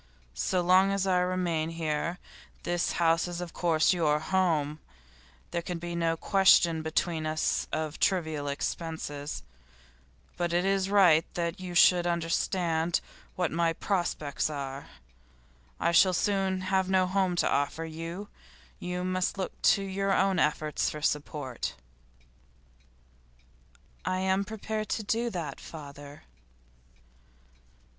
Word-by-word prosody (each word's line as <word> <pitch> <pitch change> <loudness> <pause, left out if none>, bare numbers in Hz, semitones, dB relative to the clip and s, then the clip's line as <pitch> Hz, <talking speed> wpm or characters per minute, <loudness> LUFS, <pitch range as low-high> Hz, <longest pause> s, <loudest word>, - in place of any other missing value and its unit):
So 185 -1 0
long 185 +2 +5
as 195 -1 0
I 185 -1 +3
remain 180 -3 0
here 165 +1 -2 0.5
this 175 0 0
house 165 0 +2
is 175 -1 -5
of 175 -2 -6
course 165 0 +3
your 155 -4 +2
home; 155 -3 0 0.7
there 170 - -1
can 175 0 -4
be 170 +1 -5
no 165 -1 0
question 175 -3 +4
between 160 0 -1
us 155 0 0
of 155 0 -3
trivial 160 -6 0
expenses. 145 0 -4 0.9
But 175 -1 -1
it 175 +2 +2
is 195 -1 +1
right 180 -6 +6
that 170 +1 -2
you 180 -1 -6
should 175 0 +6
understand 170 0 0 0.4
what 180 -2 0
my 165 0 +1
prospects 165 -6 -1
are. 140 -2 -5 0.9
I 170 - +2
shall 185 +2 +5
soon 190 0 0
have 190 0 0
no 190 -1 +3
home 185 -1 +1
to - - +2
offer 145 +3 0
you; 165 +5 -6 0.5
you 180 0 -3
must 185 +1 -1
look 190 - -2 0.2
to 200 - -4
your 195 0 -1
own 195 -2 +2
efforts 150 0 +1
for 150 -1 -7
support.' 145 -4 -2 2.3
'I 185 - -1
am 190 +1 +1
prepared 215 +1 -4
to 220 - -1
do 230 +3 0
that, 165 -9 -5
father. 145 -2 -10
175 Hz, 130 wpm, -29 LUFS, 160-185 Hz, 2.3 s, right